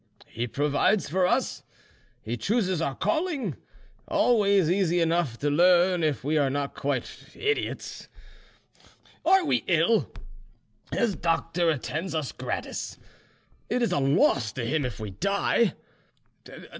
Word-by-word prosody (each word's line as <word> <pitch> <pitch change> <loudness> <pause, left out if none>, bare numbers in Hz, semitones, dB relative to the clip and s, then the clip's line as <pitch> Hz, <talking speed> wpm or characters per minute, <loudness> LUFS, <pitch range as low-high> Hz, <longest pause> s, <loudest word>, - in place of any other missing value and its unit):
He 120 +2 -4
provides 150 - +1
for 180 +4 +1
us, - - 0 0.6
he 115 +2 -3
chooses 190 - 0
our 140 -4 -1
calling, 320 -4 -1 0.5
always 200 -7 +3
easy 175 -1 +2
enough 165 -7 +1
to 145 +3 -1
learn 175 +2 +4
if 150 -4 0
we 150 +3 +1
are 140 -2 +2
not 140 +1 -2
quite 140 -3 -4
idiots. 430 0 -3 1.2
Are 375 +2 +4
we 255 - +1
ill? 175 +6 +2 0.8
His 225 -5 0
doctor 165 0 0
attends 160 +4 -3
us 155 -4 -2
gratis; - - -5 0.7
it 245 +2 +1
is 235 - +1
a - - +1
loss 135 -4 +2
to 120 -1 -4
him 145 +3 0
if 120 -5 -5
we 105 -2 -5
die. 200 - +1
165 Hz, 130 wpm, -26 LUFS, 140-200 Hz, 1.2 s, learn